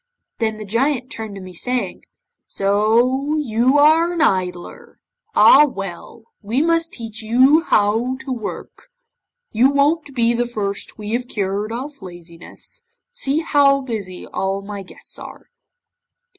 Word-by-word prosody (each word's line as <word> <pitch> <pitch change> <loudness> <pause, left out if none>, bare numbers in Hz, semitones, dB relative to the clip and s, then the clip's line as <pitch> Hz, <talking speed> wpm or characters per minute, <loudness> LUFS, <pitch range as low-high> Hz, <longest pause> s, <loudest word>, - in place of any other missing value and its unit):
'Then 220 -2 -1
the 215 - -7
Giant 255 +4 -1
turned 220 -2 -6
to 195 - -8
me, 185 -1 -10
saying, 240 +1 -3 0.4
'"So 235 +8 +1
you 255 -1 +2
are 320 +4 +4
an 340 - -2
idler! 180 -2 -2 0.4
Ah! 295 +3 +8
well, 195 0 -8 0.2
we 220 +5 -1
must 330 +1 +1
teach 225 -2 -8
you 260 +8 +4
to 240 +6 +1
work. 235 - -7 0.6
You 240 +5 +4
won't 285 +1 +1
be 235 -1 +2
the 240 0 -1
first 200 -4 -5
we 210 0 -6
have 245 +1 -2
cured 205 0 -3
of 275 +4 -6
laziness. 175 - -12 0.3
See 310 - -1
how 280 -3 +3
busy 210 -8 -6
all 195 +1 -3
my 200 0 -7
guests 185 - -11
are." - - -12
235 Hz, 135 wpm, -20 LUFS, 205-275 Hz, 0.6 s, Ah